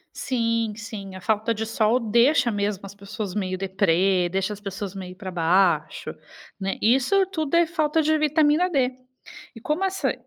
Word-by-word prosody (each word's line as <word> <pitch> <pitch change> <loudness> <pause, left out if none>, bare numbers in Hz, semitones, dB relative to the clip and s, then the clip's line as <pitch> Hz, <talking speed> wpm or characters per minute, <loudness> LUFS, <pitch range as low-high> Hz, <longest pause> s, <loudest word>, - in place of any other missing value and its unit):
Sim, 230 -3 -1
sim, 210 -4 -8
a 185 - -8
falta 220 +4 0
de 220 +1 -3
sol 225 +2 +1
deixa 235 +3 +3
mesmo 205 -2 -2
as 195 - -9
pessoas 200 0 -6
meio 185 -2 -2
deprê, 190 -1 +1
deixa 190 +3 -1
as 205 - -8
pessoas 195 -1 -5
meio 185 -2 -8
pra 190 0 -7
baixo, 175 -1 +1 0.5
né, 195 0 -2
isso 270 - +3
tudo 320 -5 -3
é 340 0 +5
falta 320 -1 0
de 310 +1 +2
vitamina 305 +3 +3
D, 270 -7 +1 0.6
e 230 - -11
como 305 - -1
essa 380 0 0
215 Hz, 170 wpm, -24 LUFS, 195-285 Hz, 0.6 s, é